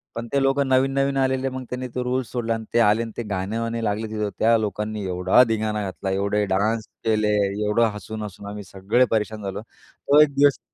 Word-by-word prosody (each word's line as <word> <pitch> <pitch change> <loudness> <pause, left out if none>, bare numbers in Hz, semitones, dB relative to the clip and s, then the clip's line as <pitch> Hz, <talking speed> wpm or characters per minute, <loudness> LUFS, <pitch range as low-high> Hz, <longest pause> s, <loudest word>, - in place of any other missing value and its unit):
पण 115 0 -5
ते 140 - +3
लोक 135 +1 +2
नवीन-नवीन 135 +1 +1
आलेले. 130 0 +1
मग 130 0 -6
त्यांनी 125 0 -4
तो 125 - -1
रुल्स 125 -3 -2
सोडला 115 -2 -1
आणि 115 0 -4
ते 120 - +4
आले 110 0 +4
आणि 115 - -7
ते 120 - -2
गाणे-वाणे 115 +4 -2
लागले 105 +2 -1
तिथं. 105 -1 -2
त्या 115 +1 +4
लोकांनी 105 0 -3
एवढा 90 +6 +4
धिंगाणा 110 -1 -1
घातला, 95 0 -4
एवढे 100 +2 0
डान्स 105 +4 0 0.2
केले, 110 -1 +2 0.4
एवढं 115 +3 +3
हसून-हसून 105 0 -7
आम्ही 105 0 -7
सगळे 100 +6 +1
परेशान 110 -1 -1
झालो. 100 +1 -4
तो 140 +5 0
एक 150 -2 +4
दिवस 140 0 +4
110 Hz, 195 wpm, -23 LUFS, 105-125 Hz, 0.4 s, ते